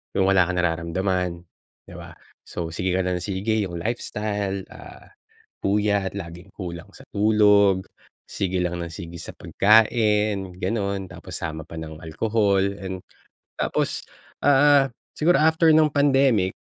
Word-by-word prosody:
yung 95 - +3
wala 95 -2 +4
kang 90 0 -1
nararamdaman, 90 +1 -1 0.5
'di - - -11
ba. - - -10 0.3
So, 85 - -5
sige 90 +2 -1
ka 90 - +1
lang 90 -1 -1
ng 90 - -7
sige 105 +2 -1
yung 85 -3 -5
lifestyle, 105 -2 -3
ah, - - -13 0.5
puyat, 100 -1 +1
laging 90 0 -9
kulang 85 -3 -7
sa - - -14
tulog, 100 -2 +4 0.4
sige 95 -1 -1
lang 90 0 -2
ng 85 -1 -6
sige 85 +1 -8
sa - - -8
pagkain, 105 -3 +2
ganon 100 -4 -2
tapos 90 +1 -11
sama 80 -1 -5
pa 85 - -11
ng 80 -1 -8
alcohol 100 +4 +1 0.2
and 95 -2 -6 0.6
tapos, - - -1 0.4
ah, 145 0 +5 0.3
siguro 175 +4 +3
after 160 +1 +4
nung 155 -1 +4
pandemic, 135 -9 +2
95 Hz, 140 wpm, -23 LUFS, 90-110 Hz, 0.6 s, ah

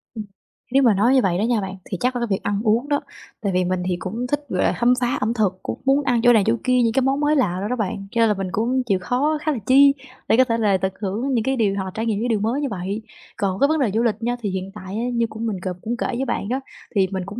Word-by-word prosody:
Ừm. 215 - -4 0.5
Nếu 270 +1 +4
mà 230 -4 +5
nói 225 +7 +3
như 260 - +5
vậy 180 -3 +1
đó 205 - 0
nha 230 -2 +1
bạn, 190 0 -5 0.2
thì 185 - -2
chắc 250 +1 +1
là - - -1
cái 235 - 0
việc 190 - -1
ăn 205 0 -1
uống 235 +6 +1
đó. 285 - +1 0.4
Tại 200 -3 -1
vì 180 0 +2
mình 180 0 -1
thì 180 - +1
cũng 230 +7 -4
thích 290 +2 -2
về 185 - +1
khám 245 +1 +4
phá 245 +2 +1
ẩm 220 +3 +1
thực, 195 -5 0
cũng - - -5
muốn 275 +2 +3
ăn 245 -3 +1
chỗ 245 -1 +7
này 215 -3 +4
chỗ 225 +2 +3
kia, 255 -1 +3
những 225 -1 +1
cái 270 - +2
món 270 +2 +1
mới 295 +1 +2
lạ 200 -11 +1
đồ 205 - -2
đó 250 - -1
bạn, 200 -3 -3
cho 230 - +1
nên 225 - +5
là 210 - +3
mình 195 -1 -3
cũng 250 +5 0
chịu 195 -5 +1
khó 290 +9 0
khá 310 - 0
là 280 - -2
chi 275 +2 +6 0.3
để 225 - +4
có 260 - +7
thể 230 -2 -1
là 205 -4 +2
tận 190 +1 -1
hưởng 220 +7 -2
những 230 -3 +1
cái 265 +1 0
điều 205 -5 +1
hoặc 195 - -2
là 190 - -5
trải 225 +1 -3
nghiệm 215 -3 0
những 240 - -1
điều 220 -3 +1
mới 235 +7 -1
như 285 - 0
vậy. 195 +3 -4 0.4
Còn 195 -1 -1
cái 280 - +5
vấn 315 +1 +1
đề 250 -7 +1
du 225 +4 +1
lịch 225 -4 +2
nha, 240 +1 0
thì 205 - -2
hiện 190 +1 -4
tại 190 -1 -7
á 225 - -2
như 235 -1 +1
cũng 220 +1 -5
mình 215 -4 -2
c 180 -1 -5
cũng 235 +2 -3
kể - - -1
với 260 +2 -2
bạn 215 -4 -2
đó 260 +2 0 0.4
thì 195 -2 +3
mình 190 -1 -3
cũng 205 +5 -7
225 Hz, 325 wpm, -22 LUFS, 195-255 Hz, 0.5 s, chỗ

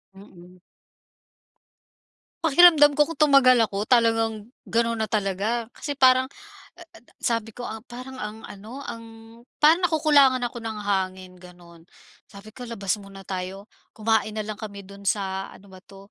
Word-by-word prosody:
Mm. 180 -2 -16 1.8
Pakiramdam 310 -2 +6
ko 295 - +5
kung 330 0 -8
tumagal 275 -4 +5
ako 200 +1 -3
talagang 225 -2 +1 0.2
gano'n 230 -1 -1
na 220 - -5
talaga 215 +3 -1
kasi 295 - -6
parang, 260 -2 +4 0.5
a 350 - -14
a, 330 - -17 0.2
sabi 225 -2 -2
ko, 245 - -8
ah, 220 -2 -6
parang 255 +2 -10
ang 215 0 -7
ano, 220 +8 -10
ang 230 -3 -8 0.6
parang 335 +4 +5
nakukulangan 290 -5 +3
ako 240 - -9
ng 225 -2 -6
hangin 190 -2 -2
gano'n. 175 -2 -16 0.4
Sabi 205 +1 -14
ko 245 +2 -10
labas 205 -3 -2
muna 195 -1 -12
tayo, 190 +2 -7 0.2
kumain 220 -1 0
nalang 215 -1 -5
kami 200 -2 -8
do'n 200 +1 -13
sa 195 -1 -1
ano 200 0 -16
ba 185 - -13
to 195 +1 -17
220 Hz, 150 wpm, -24 LUFS, 195-255 Hz, 1.8 s, Pakiramdam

